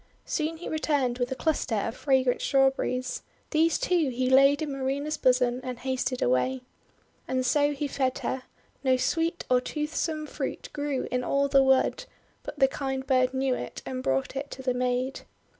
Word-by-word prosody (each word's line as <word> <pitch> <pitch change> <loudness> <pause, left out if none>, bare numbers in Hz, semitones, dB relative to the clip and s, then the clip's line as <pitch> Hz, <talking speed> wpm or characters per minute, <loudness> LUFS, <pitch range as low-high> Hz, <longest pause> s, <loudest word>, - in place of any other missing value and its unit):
Soon 320 0 -2
he 350 - -7
returned 285 -6 0
with 245 +1 -1
a - - -1
cluster 290 -6 0
of 225 +3 -2
fragrant 260 -3 +2
Strawberries. 265 -2 +1 0.3
These, 325 +1 +3
too, 340 -6 +1
he 255 +1 -1
laid 275 +3 +5
in 300 - -3
Marina's 275 +3 -2
bosom, 250 -3 +2
and 250 -1 -4
hasted 260 0 -2
away. 245 - +1 0.6
And 255 0 0
so 290 +2 +3
he 290 +1 -2
fed 260 -2 -1
her. 260 - -1 0.4
No 260 -1 +3
sweet 330 +6 0
or 250 -1 +3
toothsome 305 +2 -2
fruit - - -5
grew 290 -3 -2
in 250 0 0
all 280 +2 +1
the 275 -1 +5
wood, 265 - +2 0.4
but 295 - -8
the 270 - +5
kind 265 -1 -3
bird 255 -1 +3
knew 265 0 +1
it 125 - -6
and 130 -1 -4
brought 135 - -1
it 280 +1 -4
to 265 - -8
the 255 -1 +1
maid. 250 +1 -1
265 Hz, 175 wpm, -27 LUFS, 255-290 Hz, 0.6 s, laid